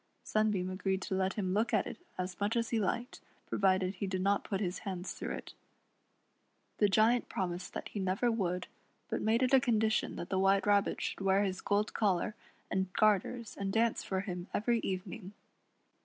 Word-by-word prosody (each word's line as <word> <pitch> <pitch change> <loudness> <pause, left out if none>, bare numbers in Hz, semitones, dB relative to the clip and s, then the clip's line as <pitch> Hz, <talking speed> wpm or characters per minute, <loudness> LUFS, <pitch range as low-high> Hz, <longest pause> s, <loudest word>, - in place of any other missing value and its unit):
Sunbeam 210 -4 +1
agreed 190 0 -1
to - - -3
let 190 0 +1
him 185 -3 -1
look 220 +4 +2
at - - +2
it - - -7 0.2
as 180 -1 -4
much 205 +3 0
as 230 -1 0
he 230 - +2
hked, 230 +5 -2 0.3
provided 190 -1 +2
he 195 +1 -3
did 185 -1 -1
not 200 +1 +2
put 195 - -2
his 180 -3 -2
hands 185 -3 -4
through - - -5
it - - -9 1.3
The 205 - +5
Giant 225 +4 +3
promised 180 -1 -3
that - - -4
he 210 - -5
never 195 +6 +1
would, 180 -5 -1 0.4
but - - -1
made 225 +4 +2
it 255 - +1
a 270 - +9
condition 220 -4 +1
that 175 - -6
the 190 - +1
White 195 +1 +4
Rabbit 205 -1 +3
should - - -3
wear 195 +1 +3
his 190 -2 -2
gold 205 +1 +1
collar 205 -1 +1 0.4
and 190 -1 0
garters 215 +2 +2
and 195 -1 -1
dance 225 +2 +2
for 190 -1 -1
him 180 -2 -5
every 235 +2 +2
evening. 190 0 -4
195 Hz, 190 wpm, -33 LUFS, 185-215 Hz, 1.3 s, a